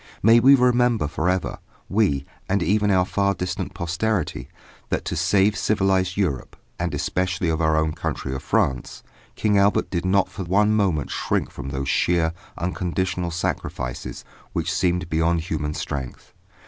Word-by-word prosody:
May 115 Hz, +3 st, +7 dB
we 135 Hz, +4 st, +7 dB
remember 125 Hz, -, +3 dB
for 80 Hz, +4 st, -1 dB
ever, 90 Hz, -1 st, -1 dB, 0.3 s
we, 95 Hz, -10 st, +1 dB, 0.2 s
and 100 Hz, -1 st, +2 dB
even 105 Hz, +4 st, +2 dB
our 95 Hz, -2 st, +3 dB
far 100 Hz, +1 st, +1 dB
distant 90 Hz, +1 st, -4 dB
posterity, 90 Hz, +2 st, -2 dB, 0.4 s
that -, -, -1 dB
to -, -, -2 dB
save 95 Hz, +4 st, +3 dB
civilised 95 Hz, -3 st, +1 dB
Europe, 85 Hz, -11 st, -1 dB, 0.2 s
and -, -, -1 dB
especially 90 Hz, -2 st, -1 dB
our 80 Hz, -1 st, +2 dB
own 80 Hz, 0 st, +1 dB
country 75 Hz, -4 st, -4 dB
of 65 Hz, -, -4 dB
France, 75 Hz, -, -1 dB, 0.3 s
King 105 Hz, -2 st, +2 dB
Albert 100 Hz, +1 st, +2 dB
did 85 Hz, -2 st, -1 dB
not 95 Hz, +1 st, +3 dB
for 95 Hz, -, -6 dB
one 105 Hz, +4 st, +3 dB
moment 95 Hz, -10 st, +1 dB
shrink -, -, -1 dB
from 70 Hz, -, -7 dB
those 70 Hz, 0 st, -3 dB
sheer, 85 Hz, -2 st, +2 dB, 0.2 s
unconditional 90 Hz, 0 st, -2 dB
sacrifices 60 Hz, -7 st, -4 dB, 0.3 s
which -, -, -1 dB
seemed 90 Hz, -1 st, 0 dB
beyond 80 Hz, +1 st, +1 dB
human 75 Hz, -2 st, -3 dB
strength. 65 Hz, -4 st, -6 dB
90 Hz, 150 wpm, -23 LUFS, 80-100 Hz, 0.4 s, May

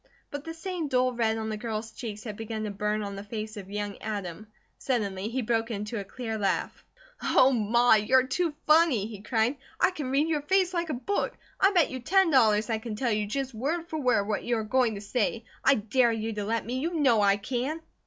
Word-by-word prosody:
But 285 Hz, +1 st, -6 dB
the 325 Hz, -, -5 dB
same 340 Hz, -1 st, -4 dB
dull 255 Hz, -2 st, +2 dB
red 225 Hz, -2 st, +1 dB
on 220 Hz, 0 st, -3 dB
the 215 Hz, -, -3 dB
girl's 220 Hz, 0 st, -4 dB
cheeks 220 Hz, -2 st, -7 dB
had 215 Hz, -3 st, -6 dB
begun 220 Hz, 0 st, -5 dB
to 210 Hz, -, -3 dB
burn 210 Hz, +1 st, -1 dB
on 200 Hz, -1 st, -5 dB
the 200 Hz, -, -6 dB
face 215 Hz, +1 st, -6 dB
of 195 Hz, -2 st, -8 dB
young 205 Hz, 0 st, -4 dB
Adam. 205 Hz, -2 st, -5 dB, 0.3 s
Suddenly 205 Hz, -6 st, -1 dB
he 255 Hz, +2 st, -2 dB
broke 225 Hz, 0 st, 0 dB
into 210 Hz, 0 st, -3 dB
a -, -, -4 dB
clear 225 Hz, +1 st, -5 dB
laugh. 200 Hz, -, -1 dB, 0.4 s
"Oh, 260 Hz, -, +5 dB
Ma, 235 Hz, +1 st, +4 dB
you're 250 Hz, +5 st, +4 dB
too 320 Hz, +3 st, -1 dB
funny!" 305 Hz, -9 st, +4 dB
he 210 Hz, -2 st, -8 dB
cried. 225 Hz, +5 st, 0 dB, 0.2 s
"I -, -, +4 dB
can 295 Hz, -8 st, -5 dB
read 280 Hz, +4 st, +2 dB
your 310 Hz, -3 st, 0 dB
face 370 Hz, +4 st, +2 dB
like 340 Hz, -2 st, -1 dB
a 300 Hz, -, -1 dB
book. 400 Hz, +12 st, -2 dB, 0.2 s
I 390 Hz, -, +5 dB
bet 350 Hz, -6 st, +3 dB
you 260 Hz, -, -4 dB
ten 380 Hz, +7 st, +3 dB
dollars 220 Hz, -5 st, +4 dB
I 225 Hz, -2 st, -1 dB
can 220 Hz, -1 st, -5 dB
tell 240 Hz, +2 st, 0 dB
you 210 Hz, -1 st, 0 dB
just 265 Hz, +3 st, -3 dB
word 315 Hz, +9 st, -2 dB
for 315 Hz, -, -3 dB
word 250 Hz, -7 st, +2 dB
what 215 Hz, -, -1 dB
you 240 Hz, -1 st, 0 dB
are 220 Hz, -, -2 dB
going 240 Hz, 0 st, +1 dB
to 200 Hz, -, -6 dB
say. 225 Hz, +1 st, -1 dB, 0.2 s
I 270 Hz, -, +6 dB
dare 235 Hz, +3 st, +2 dB
you 225 Hz, 0 st, -2 dB
let 225 Hz, +2 st, -1 dB
me! 250 Hz, +3 st, -2 dB
You 335 Hz, +5 st, -2 dB
know 255 Hz, -8 st, +4 dB
I 200 Hz, 0 st, +4 dB
can!" 255 Hz, +9 st, -2 dB
230 Hz, 230 wpm, -28 LUFS, 215-270 Hz, 0.4 s, I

